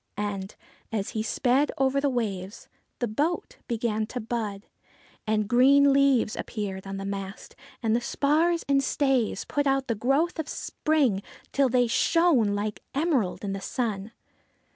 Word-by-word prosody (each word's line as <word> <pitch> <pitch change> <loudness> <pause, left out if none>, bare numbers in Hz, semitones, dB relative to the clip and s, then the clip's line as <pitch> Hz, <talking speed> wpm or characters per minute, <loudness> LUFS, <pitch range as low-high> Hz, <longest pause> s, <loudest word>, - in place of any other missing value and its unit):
And, 200 -1 -4 0.4
as 205 -3 -2
he 220 - -2
sped 255 +5 +1
over 270 +1 +2
the 285 - +2
waves, 205 -6 -3 0.3
the 240 - -1
boat 295 +11 -2
began 220 -2 -1
to 250 - -5
bud; 215 -3 -4 0.6
and 215 -1 +1
green 275 +4 +5
leaves 275 -5 +3
appeared 195 -3 -5
on 195 0 -5
the 195 - -5
mast, 195 0 -6 0.3
and 225 0 +2
the 240 - +1
spars 315 +7 +1
and 275 -1 +3
stays 265 -8 +1
put 290 -1 0
out 270 0 +2
the 230 - +1
growth 275 - +1
of 310 - -3
spring, 280 -11 0 0.3
till 275 -2 +3
they 245 0 +3
shone 255 - +3
like 210 +1 -3
emerald 275 - 0
in 195 - -2
the 195 - -5
sun. 215 -3 -3
240 Hz, 155 wpm, -26 LUFS, 210-275 Hz, 0.6 s, green